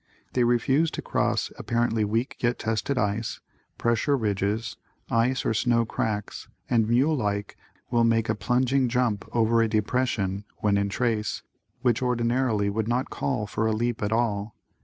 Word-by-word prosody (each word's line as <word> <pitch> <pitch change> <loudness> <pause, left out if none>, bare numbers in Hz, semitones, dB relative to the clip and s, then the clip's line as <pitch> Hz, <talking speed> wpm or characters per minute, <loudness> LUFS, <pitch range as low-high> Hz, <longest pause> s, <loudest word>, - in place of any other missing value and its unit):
They 125 - +2
refuse 130 +7 +2
to - - -2
cross - - 0
apparently 120 -2 0
weak 115 +5 -1
yet 120 0 +1
tested 110 +5 -1
ice, 110 0 -1 0.4
pressure 120 +5 +1
ridges, 105 0 -1 0.4
ice 120 +3 +1
or - - +2
snow 115 +1 +2
cracks 105 -2 -3 0.2
and 115 -2 +2
mule 135 +7 +3
like, 100 -5 -2 0.4
will 120 -1 +3
make 115 -1 +2
a 110 - +2
plunging 125 +3 +1
jump 120 -4 0
over 115 0 +3
a 115 - +3
depression 105 -3 0
(when 105 -1 +1
in 100 0 +1
trace) 110 -1 -1 0.4
which 120 -1 +2
ordinarily 120 -3 +1
would 110 +2 -1
not 125 +3 -1
call 125 -6 -1
for 105 +2 -1
a 110 - +1
leap 120 +1 -1
at 105 0 -1
all. 110 -2 0
115 Hz, 160 wpm, -26 LUFS, 105-125 Hz, 0.4 s, mule